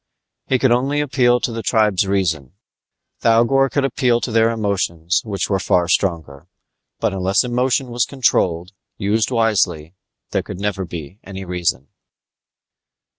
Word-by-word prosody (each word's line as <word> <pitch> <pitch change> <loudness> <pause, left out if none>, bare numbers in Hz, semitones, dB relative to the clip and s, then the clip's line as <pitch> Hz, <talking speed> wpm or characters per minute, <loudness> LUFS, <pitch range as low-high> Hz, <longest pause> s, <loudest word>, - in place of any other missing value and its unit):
He 130 - +2
could 130 0 +2
only 135 +4 +1
appeal 125 -4 +2
to - - -1
the 115 0 -4
tribe's 105 -4 +2
reason; 80 -8 -1 0.7
Thougor 120 +4 +3
could 140 0 0
appeal 125 -2 +1
to 120 - -3
their 115 0 +3
emotions 95 -6 -1
which 100 -4 -3
were 95 -2 0
far 90 -1 +1
stronger. 85 -5 -1 0.5
But - - 0
unless 95 +1 +1
emotion 125 +1 0
was 120 -1 +1
controlled, 90 -10 0 0.3
used 105 +1 0
wisely, 95 -9 0 0.4
there - - 0
could - - -8
never 100 -2 -2
be 85 +2 -8
any 95 0 -8
reason. 85 -7 -2
105 Hz, 140 wpm, -19 LUFS, 90-120 Hz, 0.7 s, Thougor